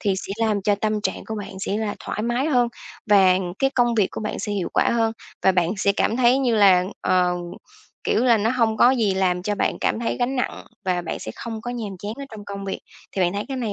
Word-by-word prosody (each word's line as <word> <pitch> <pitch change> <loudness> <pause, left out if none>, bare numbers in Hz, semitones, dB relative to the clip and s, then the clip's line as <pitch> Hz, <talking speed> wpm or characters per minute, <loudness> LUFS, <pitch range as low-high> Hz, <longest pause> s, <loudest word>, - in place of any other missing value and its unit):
thì 200 -3 +1
sẽ 195 - -5
làm 205 -2 0
cho 205 +1 +3
tâm 215 +1 -1
trạng - - -3
của 220 - -5
bạn 195 -2 -7
sẽ 205 - -1
là 215 -1 -2
thoải 210 - -4
mái 240 +5 0
hơn 245 -5 +3 0.4
và 190 -2 +6 0.2
cái 270 0 +2
công 240 -2 +3
việc 205 -4 +3
của - - -6
bạn 215 - -3
sẽ 210 - -3
hiệu 195 -4 -2
quả - - +3
hơn, 225 -1 +1 0.3
và 190 - +5
bạn 175 -1 +2
sẽ 200 0 +2
cảm 220 +3 0
thấy 255 +1 +4
như 250 -4 +2
là, 190 -4 +6 0.2
ờ, 180 -1 +2 0.7
kiểu 240 - +2
là, 235 -2 +5
nó 220 +2 +1
hông 230 -3 +1
có 240 +3 +6
gì 220 -7 +1
làm 180 -2 +1
cho 205 +2 -1
bạn - - -1
cảm - - 0
thấy 235 - -1
gánh 255 +2 -1
nặng 250 - -2 0.2
và 180 -1 0
bạn - - -4
sẽ 110 - -6
không 225 -2 -6
có 245 - -5
nhàm 215 -6 -5
chán 205 +3 -5
ở 280 - -5
trong 210 -2 -9
công 200 -1 -6
việc. 195 - -4 0.3
Thì 190 - 0
bạn 175 +1 +2
thấy 205 +1 -3
cái 270 - -3
này 225 -5 -2
210 Hz, 260 wpm, -23 LUFS, 195-235 Hz, 0.7 s, và